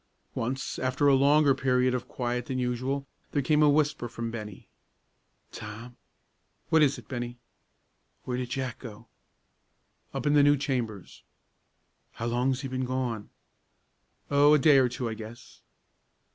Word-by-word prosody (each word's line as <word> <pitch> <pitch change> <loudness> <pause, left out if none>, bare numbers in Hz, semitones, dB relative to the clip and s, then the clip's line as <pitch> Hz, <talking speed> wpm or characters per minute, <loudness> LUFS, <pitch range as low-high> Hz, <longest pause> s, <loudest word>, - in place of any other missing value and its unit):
Once, 130 +4 -3
after 130 +3 +1
a 140 - +6
longer 140 +1 +5
period 130 -1 +1
of 125 -1 -3
quiet 125 -1 -3
than 130 - -2
usual, 130 +3 -2 0.3
there 145 - +2
came 150 +3 +3
a 150 - +6
whisper 145 -4 +1
from 115 0 -5
Bennie. 105 -4 -8 0.8
"Tom!" 110 +4 -9 0.7
"What 160 - +4
is 145 -2 +3
it, - - -13
Bennie?" 120 -2 -5 0.9
"Where 125 - -3
did 125 -1 -4
Jack 130 -2 -3
go?" 115 -2 -10 1.1
"Up - - -5
in 145 - +3
the 145 - +6
new 145 0 +5
chambers." 120 -8 -4 0.9
"How 115 - -5
long's 125 +3 0
he 135 - -4
been 130 0 -3
gone?" 125 -4 -3 1.0
"Oh, 145 +1 +6
a - - +6
day 145 0 +6
or 130 -1 +3
two, 120 0 -4
I 115 - -3
guess." 110 +2 -11
130 Hz, 150 wpm, -28 LUFS, 120-140 Hz, 1.1 s, a